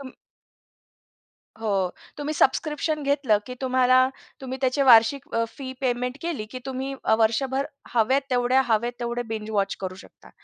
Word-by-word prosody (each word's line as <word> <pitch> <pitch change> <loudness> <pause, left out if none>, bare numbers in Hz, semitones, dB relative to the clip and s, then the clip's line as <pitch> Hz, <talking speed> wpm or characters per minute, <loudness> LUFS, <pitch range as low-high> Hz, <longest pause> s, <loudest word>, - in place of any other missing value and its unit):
तुम 265 -2 -8 1.5
हो, 200 -5 0 0.3
तुम्ही 295 +1 -3
सबस्क्रिप्शन 305 +2 +1
घेतलं, 280 -6 +2
की 250 - -6
तुम्हाला 255 0 +4 0.3
तुम्ही 260 0 -5
त्याची 265 +1 +1
वार्षिक 245 +1 +5
अ, 230 - +2
फी 260 -2 -6
पेमेंट 250 0 -1
केली, 335 -10 -3
की 255 - -6
तुम्ही 265 +1 -4 0.2
वर्षभर 265 +5 +1 0.3
हवेत 245 +4 +3
तेवढ्या, 250 +1 +3
हवेत 235 +1 +1
तेवढे 240 0 -2
बिंज 215 -1 -5
वॉच 200 -2 0
करू 185 -1 -4
शकता. - - -18
255 Hz, 145 wpm, -25 LUFS, 230-275 Hz, 1.5 s, वार्षिक